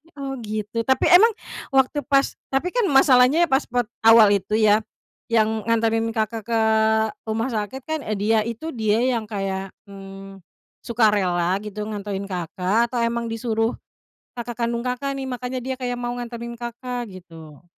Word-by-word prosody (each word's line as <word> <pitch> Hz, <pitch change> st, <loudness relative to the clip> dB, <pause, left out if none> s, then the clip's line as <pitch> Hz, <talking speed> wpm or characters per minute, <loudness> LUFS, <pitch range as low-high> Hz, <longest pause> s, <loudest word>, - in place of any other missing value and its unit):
Oh, 275 Hz, -1 st, -5 dB
gitu, 215 Hz, 0 st, -4 dB
tapi 265 Hz, -, +3 dB
emang 365 Hz, +6 st, +8 dB, 0.5 s
waktu 265 Hz, +2 st, +3 dB
pas 275 Hz, -1 st, +1 dB
tapi 270 Hz, +7 st, -1 dB
kan 480 Hz, -5 st, +1 dB
masalahnya 270 Hz, +2 st, +5 dB
ya 340 Hz, -, 0 dB
pas 265 Hz, +2 st, +2 dB
per 245 Hz, 0 st, 0 dB, 0.2 s
awal 225 Hz, -2 st, +7 dB
itu 205 Hz, +3 st, -3 dB
ya, 215 Hz, -1 st, +4 dB, 0.5 s
yang 220 Hz, -1 st, +2 dB
nganterin 225 Hz, 0 st, +1 dB
Kakak 220 Hz, -1 st, -2 dB
ke 230 Hz, -1 st, +1 dB, 0.7 s
rumah 225 Hz, +4 st, -1 dB
sakit 230 Hz, +4 st, -4 dB
kan, 315 Hz, +2 st, -3 dB, 0.2 s
dia 215 Hz, +2 st, +2 dB
itu 235 Hz, +8 st, -5 dB
dia 220 Hz, -5 st, 0 dB
yang 235 Hz, -4 st, 0 dB
kayak, 195 Hz, -2 st, -4 dB
hmm, 195 Hz, -1 st, -11 dB, 0.4 s
sukarela 195 Hz, -5 st, +1 dB
gitu 210 Hz, 0 st, -6 dB
nganterin 205 Hz, -2 st, -4 dB
Kakak 185 Hz, +6 st, 0 dB
atau 235 Hz, -1 st, -1 dB
emang 235 Hz, 0 st, -1 dB
disuruh 225 Hz, 0 st, -1 dB, 0.6 s
kakak 235 Hz, 0 st, -3 dB
kandung 235 Hz, +1 st, -3 dB
Kakak 275 Hz, +2 st, -2 dB
nih, 270 Hz, -, -4 dB
makanya 250 Hz, 0 st, -4 dB
dia 260 Hz, 0 st, -2 dB
kayak 245 Hz, -1 st, -2 dB
mau 240 Hz, 0 st, -3 dB
nganterin 235 Hz, -1 st, -7 dB
Kakak, 240 Hz, 0 st, -5 dB
gitu? 165 Hz, -5 st, -13 dB
230 Hz, 155 wpm, -22 LUFS, 210-250 Hz, 0.7 s, emang